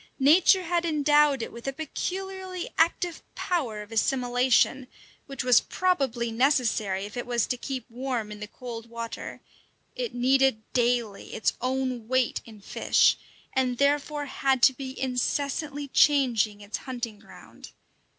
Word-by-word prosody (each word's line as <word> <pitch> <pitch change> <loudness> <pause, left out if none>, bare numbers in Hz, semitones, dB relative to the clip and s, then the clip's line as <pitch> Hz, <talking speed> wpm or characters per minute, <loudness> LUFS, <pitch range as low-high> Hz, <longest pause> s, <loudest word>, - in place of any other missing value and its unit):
Nature 330 +7 +5
had 345 0 0
endowed 295 -4 +3
it - - -6
with 235 +3 -10
a - - +1
peculiarly 370 +5 -5
active 335 +1 +1
power 245 - -2
of 210 - -17
assimilation, 250 +2 +2 0.4
which 275 -3 -4
was 250 -2 +5
probably 265 -11 0
necessary 225 -6 +1
if 205 - -10
it 245 - -4
was 240 -3 +1
to - - -2
keep 255 -1 -5
warm 245 -3 -4
in 210 - -8
the 210 - -6
cold 230 0 -8
water; 230 0 -7 0.5
it - - -4
needed 260 -2 +3
daily 240 -4 0
its - - +1
own 255 -2 -2
weight 255 -1 +1
in 220 -2 -13
fish, 200 - +3 0.4
and 255 -2 0
therefore 290 +1 +1
had 270 -2 0
to 265 - +7
be 260 0 -7
incessantly 280 +3 -2
changing 245 -8 +3
its 205 +1 -5
hunting 240 -5 -6
ground. 220 - -14
260 Hz, 140 wpm, -27 LUFS, 235-290 Hz, 0.5 s, to